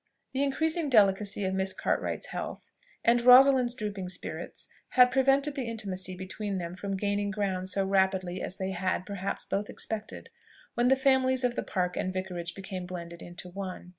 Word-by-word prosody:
The 265 - 0
increasing 315 +3 +1
delicacy 205 -3 +3
of 190 - -1
Miss 190 0 +1
Cartwright's - - -1
health, - - -6 0.3
and 235 +1 +5
Rosalind's 250 0 +7
drooping 205 -5 -4
spirits, 180 - -5 0.3
had 250 -1 +7
prevented 275 +2 +3
the 260 -5 -3
intimacy 190 -5 -4
between 195 +2 -4
them 170 -1 -4
from 195 +1 -4
gaining 205 +1 0
ground 190 -2 -2
so 195 +1 +1
rapidly 190 -2 +1
as 185 - -3
they 190 0 -2
had, 185 0 -1
perhaps, 200 -1 -4
both 205 +1 -2
expected, 220 -1 -6 0.4
when 240 +1 +2
the 265 - +6
families 260 -1 +3
of 245 -1 +1
the - - -1
Park 180 -2 -2
and 185 - -1
Vicarage 180 -2 -4
became 190 -2 -6
blended 170 -2 -7
into 175 +1 -8
one. 185 -1 -6
195 Hz, 170 wpm, -29 LUFS, 185-245 Hz, 0.4 s, Rosalind's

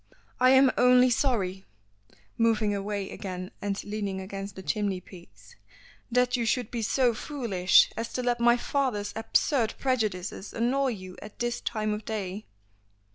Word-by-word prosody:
"I 255 0 +5
am 265 0 +6
only 250 0 +6
sorry" 195 -7 0 0.7
moving 225 -2 +2
away 200 -1 -3
again 185 -2 -6
and 200 -1 -3
leaning 205 -2 -3
against 195 +1 -7
the 190 - -9
chimney 205 -3 -1
piece 105 - -16 0.6
"that 250 +1 +2
you 240 - 0
should 230 0 0
be 235 - -3
so 245 +2 +2
foolish 220 -9 +2
as 230 +1 -4
to 250 - -2
let 240 -1 0
my 240 0 +5
father's 245 -6 -1
absurd 230 +1 +1
prejudices 215 -7 -2
annoy 260 +4 +1
you 185 -3 -10
at 210 0 -11
this 240 0 -2
time 215 -2 -2
of 210 +1 -5
day." 205 -2 -5
215 Hz, 150 wpm, -27 LUFS, 195-245 Hz, 0.7 s, am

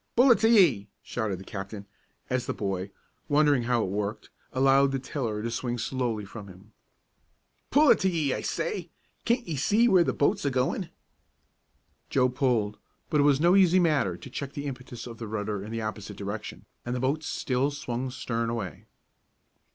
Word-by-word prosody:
"Pull 250 +2 +6
it 235 - +5
to 225 - +4
ye!" 150 - +5
shouted 105 -6 -3
the - - -9
captain, 100 0 -7 0.4
as 125 -1 -1
the - - -2
boy, 95 -1 -3 0.4
wondering 145 -2 +4
how 120 -2 +2
it - - -2
worked, 105 +1 -3 0.2
allowed 135 +1 +4
the 135 - 0
tiller 120 -5 -3
to 115 - -2
swing 120 +1 -2
slowly 120 -3 -2
from 100 0 -9
him. 95 +3 -15 1.0
"Pull 290 -1 +6
it 230 - +5
to 190 - +2
ye, 155 -6 0
I - - -3
say! 470 -4 -3 0.4
Can't 240 -1 +1
ye 165 - -2
see 210 - +3
where 185 -6 +5
the - - 0
boat's 145 - +1
a 140 - +2
goin'?" 135 +7 -1 1.2
Joe 130 -1 +3
pulled; 120 -5 0 0.3
but 150 - +3
it - - +5
was 140 -1 +4
no 175 +4 +5
easy 185 -2 +5
matter 150 - +2
to 130 - -11
check 140 +1 -5
the 145 - -5
impetus 125 -3 -7
of 115 -2 -9
the 115 - -5
rudder 105 -2 -3
in 105 - -8
the 115 0 -3
opposite 105 -2 -5
direction, 105 +1 -6 0.2
and 120 +1 -3
the - - -2
boat 135 +5 0
still 135 -2 -1
swung 130 -3 -4
stern 115 -2 -2
away. 105 -9 -5
125 Hz, 190 wpm, -27 LUFS, 110-145 Hz, 1.2 s, Pull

